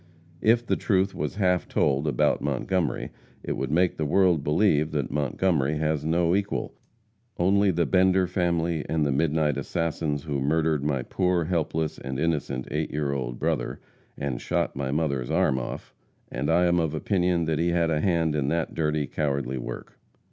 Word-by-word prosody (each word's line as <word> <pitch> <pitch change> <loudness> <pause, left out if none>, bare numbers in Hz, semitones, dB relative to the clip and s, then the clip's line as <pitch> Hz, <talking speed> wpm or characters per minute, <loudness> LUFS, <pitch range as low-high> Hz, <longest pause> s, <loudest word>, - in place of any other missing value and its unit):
If 115 +2 +3
the - - +1
truth 95 -2 +1
was - - -3
half 90 -3 +1
told 70 +1 +1
about 75 - +1
Montgomery, 75 +6 -1 0.3
it - - -4
would - - -2
make 90 +3 +2
the 80 - -1
world 90 -1 +3
believe 75 -1 +2
that 70 -5 -2
Montgomery 75 +1 0
has 75 -1 0
no 85 +2 +2
equal, 100 0 -2 0.6
only 100 +3 +3
the 85 -2 +1
Bender 95 +1 +3
family 85 -3 0
and 80 -2 +1
the 70 - +1
midnight 75 0 +1
assassins 75 -1 -2
who 70 -4 -2
murdered 80 +1 +1
my 70 -4 0
poor, 90 +1 0
helpless 80 -2 -1
and 65 0 -5
innocent 70 -6 -1
eight - - -1
year 75 -1 -1
old - - -3
brother, - - -2 0.4
and 70 -4 -3
shot - - -1
my 70 -1 -3
mother's 70 -4 -1
arm 65 - +2
off; - - -7 0.4
and 70 +3 -2
I 85 +2 +4
am 85 0 +3
of 80 -2 -1
opinion 90 0 +1
he 85 +1 +2
had 85 -1 +1
a 75 -1 +1
hand 85 -4 +1
in 75 -3 0
that 80 +2 -1
dirty, 75 -2 0
cowardly 70 -2 -2
work. - - -8
80 Hz, 170 wpm, -26 LUFS, 70-85 Hz, 0.6 s, I